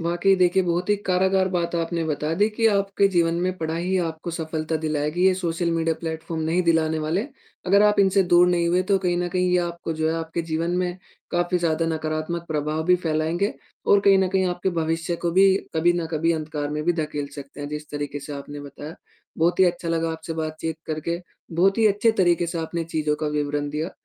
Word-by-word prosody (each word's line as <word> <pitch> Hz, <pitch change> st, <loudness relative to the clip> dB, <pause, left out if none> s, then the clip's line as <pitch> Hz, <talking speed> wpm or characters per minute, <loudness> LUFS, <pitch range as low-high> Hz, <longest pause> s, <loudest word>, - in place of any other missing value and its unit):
वाक़ई 175 Hz, +3 st, +2 dB
देखिए, 185 Hz, +1 st, +3 dB
बहुत 175 Hz, +1 st, -1 dB
ही 205 Hz, -, +4 dB
कारागर 190 Hz, +1 st, +2 dB
बात 170 Hz, -1 st, -1 dB
आपने 165 Hz, 0 st, -1 dB
बता 155 Hz, 0 st, -2 dB
दी 205 Hz, +4 st, +3 dB
कि 225 Hz, +1 st, +1 dB
आपके 200 Hz, -1 st, +2 dB
जीवन 170 Hz, -3 st, +2 dB
में 185 Hz, +1 st, 0 dB
पढ़ाई 170 Hz, +3 st, -1 dB
आपको 160 Hz, +1 st, -5 dB
सफलता 160 Hz, -1 st, -3 dB
दिलाएगी, 155 Hz, +4 st, +1 dB
ये 190 Hz, -, +5 dB
सोशल 170 Hz, -1 st, -1 dB
मीडिया 165 Hz, -1 st, +1 dB
प्लेटफॉर्म 160 Hz, 0 st, -4 dB
नहीं 165 Hz, +3 st, +1 dB
दिलाने 160 Hz, -2 st, +2 dB
वाले। 160 Hz, -, -1 dB, 0.4 s
अगर 200 Hz, +3 st, +5 dB
आप 210 Hz, 0 st, +4 dB
इनसे 195 Hz, 0 st, +4 dB
दूर 175 Hz, +1 st, +7 dB
नहीं 170 Hz, -1 st, +2 dB
हुए 180 Hz, +2 st, +2 dB
तो 195 Hz, +1 st, +2 dB
कहीं 180 Hz, -2 st, 0 dB
न 175 Hz, 0 st, -1 dB
कहीं 180 Hz, +1 st, 0 dB
ये 180 Hz, -, +4 dB
आपको, 170 Hz, -1 st, -3 dB
जो 160 Hz, 0 st, -1 dB
है, 160 Hz, -, 0 dB
आपके 165 Hz, +1 st, -3 dB
जीवन 165 Hz, +1 st, -2 dB
में, 180 Hz, 0 st, -1 dB, 0.3 s
काफ़ी 175 Hz, +1 st, +1 dB
ज़्यादा 165 Hz, -1 st, 0 dB
नकारात्मक 160 Hz, +1 st, -3 dB
प्रभाव 155 Hz, 0 st, -1 dB
भी 180 Hz, 0 st, +5 dB
फैलाएँगे 160 Hz, +5 st, 0 dB, 0.3 s
और 200 Hz, -, +5 dB
कहीं 195 Hz, -1 st, +5 dB
न 190 Hz, -, +2 dB
कहीं 190 Hz, 0 st, +1 dB
आपके 180 Hz, +1 st, -1 dB
भविष्य 165 Hz, +2 st, -1 dB
को 170 Hz, -, +2 dB
भी 190 Hz, +1 st, +5 dB, 0.2 s
कभी 170 Hz, +2 st, +3 dB
न 175 Hz, -2 st, -2 dB
कभी 165 Hz, +1 st, +1 dB
अंधकार 155 Hz, -2 st, -3 dB
में 150 Hz, 0 st, -2 dB
भी 175 Hz, -, +3 dB
धकेल 150 Hz, -3 st, -3 dB
सकते 140 Hz, 0 st, -9 dB
हैं, 145 Hz, -, -4 dB
जिस 150 Hz, 0 st, -7 dB
तरीके 145 Hz, 0 st, -4 dB
से 145 Hz, -, -8 dB
आपने 145 Hz, +1 st, -7 dB
बताया। 145 Hz, +2 st, -9 dB, 0.4 s
बहुत 170 Hz, +2 st, +2 dB
ही -, -, +8 dB
अच्छा 175 Hz, -1 st, -1 dB
लगा 165 Hz, 0 st, 0 dB
आपसे 160 Hz, 0 st, -6 dB
बातचीत 160 Hz, 0 st, -3 dB
करके, 160 Hz, +2 st, -3 dB, 0.3 s
बहुत 190 Hz, +5 st, +2 dB
ही 225 Hz, -, +5 dB
अच्छे 205 Hz, +2 st, +3 dB
तरीके 175 Hz, -1 st, +2 dB
से 170 Hz, 0 st, -4 dB
आपने 165 Hz, +1 st, -3 dB
चीज़ों 155 Hz, -2 st, -1 dB
का 155 Hz, -, -1 dB
विवरण 145 Hz, 0 st, -1 dB
दिया 155 Hz, +4 st, -3 dB
170 Hz, 215 wpm, -24 LUFS, 155-180 Hz, 0.4 s, ही